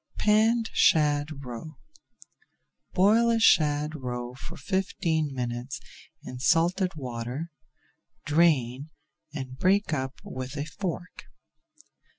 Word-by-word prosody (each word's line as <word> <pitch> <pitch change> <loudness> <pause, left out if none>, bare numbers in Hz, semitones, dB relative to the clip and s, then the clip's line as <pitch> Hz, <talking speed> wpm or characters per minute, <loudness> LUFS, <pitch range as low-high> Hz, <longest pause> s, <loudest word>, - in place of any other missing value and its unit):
PANNED 225 +2 +3
SHAD 145 -2 +2
ROE 125 +5 -8 1.2
Boil 220 +5 +4
a 230 -1 +2
shad 150 -6 +4
roe 125 -4 -5
for 150 +6 -9
fifteen 170 -6 -1
minutes 125 +2 -4 0.4
in 125 - -8
salted 175 +5 +2
water, 125 +4 -5 0.7
drain, 145 -4 +2 0.4
and 130 -3 -7
break 195 -2 +2
up 135 0 -3
with 130 +3 -6
a 145 - -2
fork. 180 +3 -6
150 Hz, 100 wpm, -27 LUFS, 130-180 Hz, 1.2 s, Boil